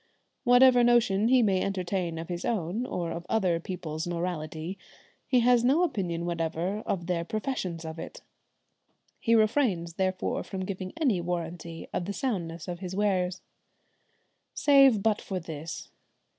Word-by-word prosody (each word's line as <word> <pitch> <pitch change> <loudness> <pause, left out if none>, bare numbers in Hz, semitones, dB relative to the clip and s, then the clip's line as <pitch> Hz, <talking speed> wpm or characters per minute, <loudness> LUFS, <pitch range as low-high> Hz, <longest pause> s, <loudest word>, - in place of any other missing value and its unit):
Whatever 245 0 +7
notion 230 -4 +4
he 255 0 +5
may 190 -3 +2
entertain 185 -3 -2
of 165 0 -5
his 175 0 -4
own, 215 +3 -1
or 175 -6 -3
of 170 - -5
other 185 -6 +2
people's 165 -2 -5
morality, 170 0 -3 0.5
he 255 -2 +4
has 245 0 +4
no 280 +8 +4
opinion 180 - -1
whatever 170 +3 -2
of 175 -3 -1
their 170 -1 -1
professions 185 -4 -3
of 160 +1 -6
it. - - -8 1.0
He 230 -1 +3
refrains 215 - +2
therefore 185 0 -1
from 190 -1 -5
giving 185 -1 -5
any 240 - +2
warranty 170 -1 -5
of 175 - -1
the 200 - -3
soundness 175 - -3
of 175 -1 -5
his 185 -1 -5
wares. 185 -3 0 1.1
Save 275 -7 +5
but 220 -2 +2
for 190 -2 -4
this. 165 -1 -7
185 Hz, 145 wpm, -28 LUFS, 170-225 Hz, 1.1 s, Whatever